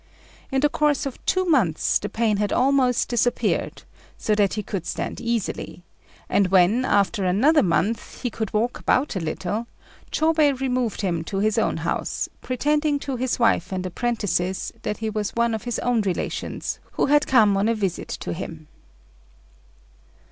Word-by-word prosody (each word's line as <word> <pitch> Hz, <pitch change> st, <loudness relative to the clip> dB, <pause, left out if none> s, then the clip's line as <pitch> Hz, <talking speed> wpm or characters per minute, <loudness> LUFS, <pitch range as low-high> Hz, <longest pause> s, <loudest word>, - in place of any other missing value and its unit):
In 265 Hz, 0 st, +1 dB
the 295 Hz, -, +5 dB
course 295 Hz, -1 st, +1 dB
of 275 Hz, -, -6 dB
two 370 Hz, 0 st, +2 dB
months 235 Hz, -, +2 dB
the 205 Hz, -, -4 dB
pain 220 Hz, -2 st, +1 dB
had 205 Hz, 0 st, 0 dB
almost 255 Hz, -1 st, +2 dB
disappeared, 245 Hz, 0 st, 0 dB, 0.3 s
so 215 Hz, -, 0 dB
that 205 Hz, -2 st, +2 dB
he 210 Hz, -, -3 dB
could 185 Hz, -3 st, -4 dB
stand -, -, -4 dB
easily; 230 Hz, -6 st, -3 dB, 0.4 s
and 200 Hz, -, +2 dB
when, 195 Hz, +7 st, +4 dB
after 200 Hz, -2 st, +2 dB
another 250 Hz, -, +4 dB
month, 210 Hz, +5 st, -1 dB
he 245 Hz, -, -1 dB
could 220 Hz, -1 st, -4 dB
walk 225 Hz, +3 st, 0 dB
about 260 Hz, -2 st, +1 dB
a -, -, 0 dB
little, 185 Hz, +7 st, -3 dB, 0.4 s
Chôbei 310 Hz, -4 st, +2 dB
removed 250 Hz, -5 st, -1 dB
him 170 Hz, -5 st, -1 dB
to 195 Hz, -, -4 dB
his 210 Hz, +2 st, +2 dB
own -, -, 0 dB
house, -, -, -2 dB
pretending 295 Hz, +3 st, +1 dB
to 280 Hz, -1 st, -4 dB
his 250 Hz, 0 st, -1 dB
wife 225 Hz, -6 st, +2 dB
and 185 Hz, -1 st, -3 dB
apprentices 185 Hz, -3 st, -1 dB
that 210 Hz, -1 st, -3 dB
he 220 Hz, 0 st, -3 dB
was 210 Hz, -1 st, -3 dB
one 235 Hz, 0 st, +2 dB
of 220 Hz, -, -4 dB
his 240 Hz, -, -2 dB
own 245 Hz, -2 st, +1 dB
relations 190 Hz, -4 st, -3 dB
who -, -, +1 dB
had 295 Hz, +1 st, +3 dB
come 215 Hz, -6 st, +5 dB
on 200 Hz, +2 st, +1 dB
a 230 Hz, -, +2 dB
visit 195 Hz, -5 st, -2 dB
to -, -, -4 dB
him. 160 Hz, -3 st, -7 dB
225 Hz, 170 wpm, -23 LUFS, 195-255 Hz, 0.4 s, the